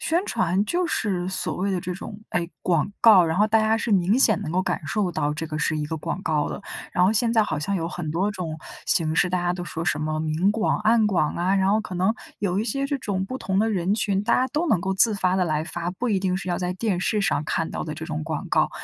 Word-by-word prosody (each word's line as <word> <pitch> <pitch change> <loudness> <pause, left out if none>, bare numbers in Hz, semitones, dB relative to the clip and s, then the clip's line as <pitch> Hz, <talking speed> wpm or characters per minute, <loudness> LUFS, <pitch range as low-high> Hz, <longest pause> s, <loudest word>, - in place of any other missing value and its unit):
宣 345 +4 0
传 185 - +1
就 355 +8 0
是 185 - -1
所 190 - -3
谓 195 +2 -1
的 190 - 0
这 180 - -4
种， 200 +3 -8
哎， 170 -1 -1
广 170 +1 +1
告， 210 -6 +8
然 160 0 -1
后 210 +3 +4
大 220 +1 +3
家 220 +1 +2
是 225 0 -1
明 195 +4 +3
显 220 -7 +4
能 155 - -4
够 185 +3 +1
感 - - -1
受 200 -5 0
到 150 -2 -1
这 160 +1 -4
个 155 -1 -4
是 155 0 0
一 150 - -2
个 160 +2 -4
广 185 +5 -4
告 155 -2 0
了。 - - -6 0.3
然 180 - +3
后 195 - +4
现 230 +1 +2
在 225 -1 +4
好 155 -7 -2
像 195 +7 -2
有 165 - -2
很 170 -3 -4
多 185 +6 0
种 170 -6 -5 0.3
形 160 -2 +1
式， 180 - +3
大 180 - 0
家 175 0 0
都 180 0 -5
说 165 -1 -5
什 150 - 0
么 155 0 -1
明 160 +5 +1
广、 220 +1 0
暗 220 +1 +3
广 175 -7 +1
啊， 180 +3 +1
然 190 -1 +2
后 215 - +3
可 185 -4 -7
能 190 +5 +1 0.2
有 195 -2 0
一 215 - 0
些 275 +3 -1
这 285 0 -1
种 200 -6 -2
不 255 - -5
同 190 -5 -1
的 220 +2 +3
人 195 -1 +1
群， 200 -2 0
大 235 - +3
家 255 - +2
都 310 +5 -1
能 215 - +2
够 190 +2 -1
自 215 +3 +4
发 185 -2 +1
地 185 - +2
来 155 -2 0
发， 170 +1 -4
不 235 +7 -3
一 205 -4 +2
定 185 -1 0
是 190 - -6
要 175 - 0
在 180 -1 -2
电 190 0 -1
视 210 +3 +1
上 195 -7 0
看 165 +1 -1
到 - - -4
的 155 - -4
这 160 +1 -7
种 155 -1 -3
广 160 -2 -4
告。 - - +2
185 Hz, 305 characters per minute, -24 LUFS, 170-210 Hz, 0.3 s, 告